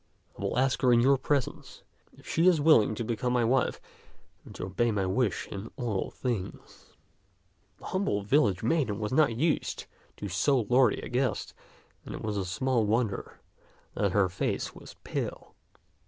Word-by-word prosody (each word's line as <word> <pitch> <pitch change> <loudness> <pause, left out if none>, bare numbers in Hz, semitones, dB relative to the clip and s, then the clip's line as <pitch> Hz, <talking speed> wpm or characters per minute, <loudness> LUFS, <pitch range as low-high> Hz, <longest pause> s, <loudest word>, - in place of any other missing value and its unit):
I - - -11
will - - -2
ask 130 +1 +1
her 125 - +4
in 120 - +6
your 135 +3 +5
presence 140 -1 -2 0.3
if - - -17
she 165 +3 +2
is 175 -4 +5
willing 145 -8 +5
to 115 - -3
become 120 +2 -2
my 120 -1 +2
wife 125 +2 +1 0.6
and - - -13
to - - -5
obey 110 +6 0
my 100 -3 0
wish 100 +1 0
in 100 +3 -6
all 115 -7 -2
things." 120 -8 -6 0.8
The - - -14
humble 185 - -1
village 105 - +2
maiden 120 -5 +1
was 105 +2 -3
not 140 -5 +3
used 155 +4 0 0.3
to 105 - -5
so 100 +9 +2
lordly 125 +4 +3
a - - -5
guest, 125 -4 -1 0.5
and - - -7
it - - -7
is 100 -4 -2
small 125 +4 +1
wonder 110 -1 -1 0.5
that 100 -3 0
her 100 -2 +4
face 90 - -2
was - - -12
pale. - - -5
120 Hz, 170 wpm, -29 LUFS, 100-130 Hz, 0.8 s, in